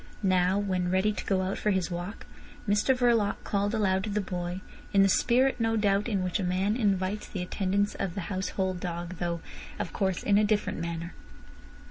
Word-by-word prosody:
Now, 185 0 +3
when 185 -3 0
ready 190 +3 +2
to 210 - -6
go 190 -2 +1
out 190 +1 -2
for 210 - 0
his 185 -4 0
walk, 175 +5 -5 0.4
Mr 210 +6 +3
Verloc 230 -5 +3
called 205 +2 0
aloud 190 -3 +1
to - - -4
the 210 +1 0
boy, 180 -1 -4 0.3
in 195 -1 +6
the - - +5
spirit, 250 +6 +3
no 225 0 +1
doubt, 205 0 +2
in 195 -4 0
which 185 +3 -1
a - - -1
man 185 +4 +1
invites 200 -3 0
the 185 -3 -4
attendance 200 +2 0
of 185 -4 -3
the 195 - -2
household 185 0 -2
dog, 175 0 -5
though, 170 -1 -2 0.4
of 170 - -4
course, 190 -3 -1
in 205 0 +4
a - - +3
different 210 -3 0
manner. 170 +1 -4
195 Hz, 195 wpm, -28 LUFS, 180-205 Hz, 0.4 s, in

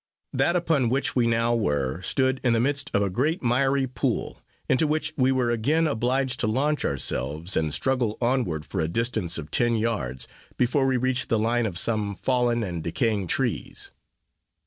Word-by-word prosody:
That 170 - +2
upon 160 -8 +1
which 135 +3 0
we 120 -2 +3
now 115 +1 +2
were, 75 - -1
stood 130 +6 +1
in 125 -2 +3
the 115 - +2
midst 140 +1 0
of 100 - +2
a 100 - 0
great 150 - -1
miry 135 +3 +2
pool, 125 -1 -3 0.3
into 150 +4 +3
which 155 +1 -1
we 130 -1 +2
were 125 -2 +1
again 145 +9 +1
obliged 130 -1 0
to 110 - +1
launch 145 +7 0
ourselves, 75 +5 -1
and 80 -1 0
struggle 120 - 0
onward 120 - 0
for 95 - -3
a 80 - 0
distance 110 -1 0
of 80 -1 -7
ten 120 -1 +3
yards, 95 - -2 0.3
before 135 +2 +2
we 130 -1 +2
reached 130 0 0
the 115 - +2
line 115 +2 +1
of 90 -5 -4
some 105 -1 +1
fallen 120 0 +1
and 85 -5 -4
decaying 105 - -1
trees. - - -2
120 Hz, 180 wpm, -25 LUFS, 100-130 Hz, 0.3 s, we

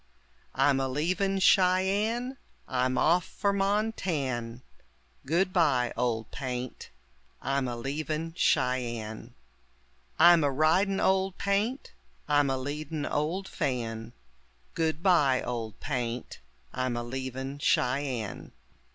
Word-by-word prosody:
I'm 140 -2 +3
a 135 - 0
leavin' 185 +8 0
Cheyenne, 200 +7 +2 0.3
I'm 130 0 0
off 170 +6 +3
for 200 +3 -1
Montan'; 165 - -1 0.6
Goodbye, 165 -7 +2
Old 115 -2 -1
Paint, 125 -2 -5 0.5
I'm 135 0 -1
a 120 - -3
leavin' 155 +6 -3
Cheyenne. 120 -5 -1 0.8
I'm 170 -1 +7
a 145 - +3
ridin' 170 +8 +2
Old 190 0 +1
Paint, 205 +7 -1 0.4
I'm 145 -1 +3
a 135 - 0
leadin' 145 +3 -4
old 165 +6 -1
Fan; 120 -8 -3 0.6
Goodbye, 160 -4 +2
Old 115 -4 -4
Paint, 125 -4 -4 0.3
I'm 130 -1 -1
a 120 - -2
leavin' 130 +2 -5
Cheyenne. 125 -6 -1
145 Hz, 100 wpm, -28 LUFS, 125-180 Hz, 0.8 s, I'm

